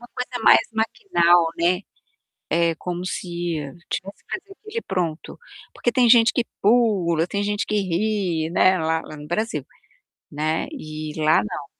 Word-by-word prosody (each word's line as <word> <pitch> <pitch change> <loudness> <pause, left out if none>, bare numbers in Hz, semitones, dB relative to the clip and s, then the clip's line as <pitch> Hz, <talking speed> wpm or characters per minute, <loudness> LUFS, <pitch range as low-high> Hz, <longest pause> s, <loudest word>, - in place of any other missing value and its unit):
uma 240 - -13
coisa 250 -1 -4
mais - - +8
maquinal, 175 - +3
né, 175 +2 +2 0.7
é 170 0 +2
como 180 +2 -5
se - - -3 0.7
tivesse 195 +2 -5
que - - -54
fazer 390 +1 -6
aquilo 390 - -17
e - - 0
pronto, 170 - -3 0.4
porque 240 - 0
tem 245 -1 +3
gente 230 -1 +6
que 245 - +1 0.2
pula, 195 -7 +3
tem 200 +2 -2
gente 205 0 -1
que 210 - -2
ri, 185 -3 -1
né, 185 +1 +4
lá 160 -1 0
lá 155 - -10
no 150 - -10
Brasil, 215 +8 -2 0.7
né, 155 +2 -1
e 155 - -6
lá 155 +1 +5
não, 140 +7 -5
180 Hz, 165 wpm, -23 LUFS, 160-225 Hz, 0.7 s, mais